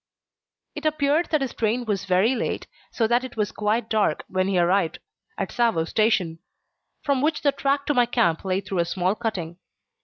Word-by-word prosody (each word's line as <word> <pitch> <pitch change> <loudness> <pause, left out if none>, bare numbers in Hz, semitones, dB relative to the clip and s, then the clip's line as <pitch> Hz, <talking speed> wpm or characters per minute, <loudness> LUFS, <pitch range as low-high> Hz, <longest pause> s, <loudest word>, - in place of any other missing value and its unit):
It 300 - -7
appeared 305 +2 +1
that 310 -3 +1
his 265 -3 -2
train 230 +2 0
was 200 -3 -2
very 195 +6 +3
late, 240 - -2 0.3
so 230 - +1
that 240 +3 +2
it 255 -3 -8
was 210 -1 0
quite 215 +2 0
dark 210 -9 +1
when 185 0 0
he 195 -2 +1
arrived 175 0 +2 0.4
at - - -2
Tsavo 230 -9 +2
Station, 190 -7 +1 0.6
from 280 -3 +1
which 300 0 0
the 285 - +4
track 280 0 0
to 295 - +1
my 245 -3 +3
camp 225 -10 +1
lay 190 0 0
through 190 -1 -3
a 170 - +2
small 180 +2 0
cutting. 185 -6 -4
220 Hz, 190 wpm, -24 LUFS, 185-260 Hz, 0.6 s, the